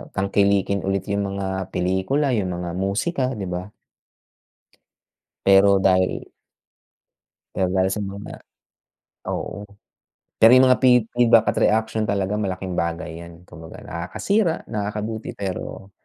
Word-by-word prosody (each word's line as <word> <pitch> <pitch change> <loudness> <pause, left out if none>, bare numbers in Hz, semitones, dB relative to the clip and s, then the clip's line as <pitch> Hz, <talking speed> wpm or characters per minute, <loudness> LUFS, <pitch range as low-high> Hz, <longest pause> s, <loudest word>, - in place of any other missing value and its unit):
tangkilikin 100 0 +1
ulit 95 -1 0
yung 100 0 -1
mga 95 -1 -3
pelikula, 95 +11 0
yung 95 -4 -1
mga 85 0 -5
musika, 105 - -1
di 100 -3 -5
ba? 90 +3 -5 1.7
Pero 100 0 +5
dahil 95 -1 +1 1.3
Pero 95 - +1
dahil 95 0 +2
sa 105 - -2
mga 100 +1 -7 0.9
oo. 100 - -5 0.7
Pero 115 - +7
yung 130 0 +6
mga 125 - +4
feed 125 -2 +5
feedback 115 -2 +5
at - - -3
reaction 110 0 +1
talaga 100 0 -1
malaking 95 -3 -3
bagay 85 -1 -3
yan. 85 0 -14
Kumbaga 80 -2 -11
nakakasira, 165 - -1
nakakabuti. 105 +1 -4
Pero 95 0 -6
100 Hz, 120 wpm, -22 LUFS, 95-110 Hz, 1.7 s, Pero